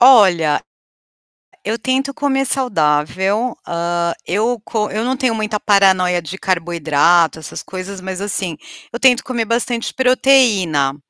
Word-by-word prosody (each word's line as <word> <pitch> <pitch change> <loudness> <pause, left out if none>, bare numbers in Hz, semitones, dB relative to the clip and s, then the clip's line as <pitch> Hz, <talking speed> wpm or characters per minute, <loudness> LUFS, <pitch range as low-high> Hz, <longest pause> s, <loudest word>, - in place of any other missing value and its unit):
Olha, 190 - +5 1.0
eu 220 +2 -2
tento 265 +3 -1
comer 275 -2 0
saudável, 195 - 0
hã, 170 0 -1
eu 225 +6 -1
co 215 -2 -2
eu 215 +2 -2
não 260 +2 -1
tenho 255 -3 0
muita 215 -1 -2
paranoia 190 -4 +3
de 175 +4 -8
carboidrato, 165 -2 +1
essas 155 - -8
coisas, 190 +1 -7
mas 190 0 -6
assim, 190 -5 -3 0.4
eu 235 - -4
tento 255 -1 +4
comer 240 -3 -2
bastante 235 +1 -2
proteína. 230 - +3
200 Hz, 130 wpm, -17 LUFS, 175-245 Hz, 1.0 s, Olha